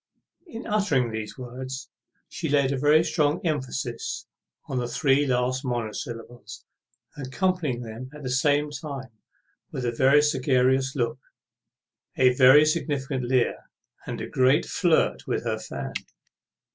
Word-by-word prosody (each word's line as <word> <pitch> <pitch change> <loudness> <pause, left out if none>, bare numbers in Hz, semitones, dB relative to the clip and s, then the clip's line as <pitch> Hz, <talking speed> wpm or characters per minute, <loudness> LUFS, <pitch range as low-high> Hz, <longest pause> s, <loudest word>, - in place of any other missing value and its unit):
In 235 -8 -8
uttering 160 - +1
these 110 +1 -5
words 130 +1 -7 0.4
she 160 - -4
laid 140 -2 +3
a 135 - -1
very 150 +3 +5
strong 150 -1 +1
emphasis 150 -6 -3 0.4
on 130 - -2
the 120 - -2
three 135 +3 +2
last 130 +1 0
monosyllables, 120 -1 -5 0.5
accompanying 145 -1 -1
them 115 +3 -8
at 150 -1 -11
the 130 - -3
same 145 +2 +2
time 140 -3 -7 0.6
with 125 - -4
a 120 - +1
very 135 +5 +4
sagacious 130 -1 +2
look, 120 -1 -1 1.0
a 130 -1 +5
very 130 +4 +7
significant 140 -5 -1
leer, 125 0 0 0.4
and - - -4
a - - -4
great 130 +2 +3
flirt 175 -4 +1
with - - -1
her - - -2
fan. - - -6
130 Hz, 135 wpm, -25 LUFS, 125-150 Hz, 1.0 s, very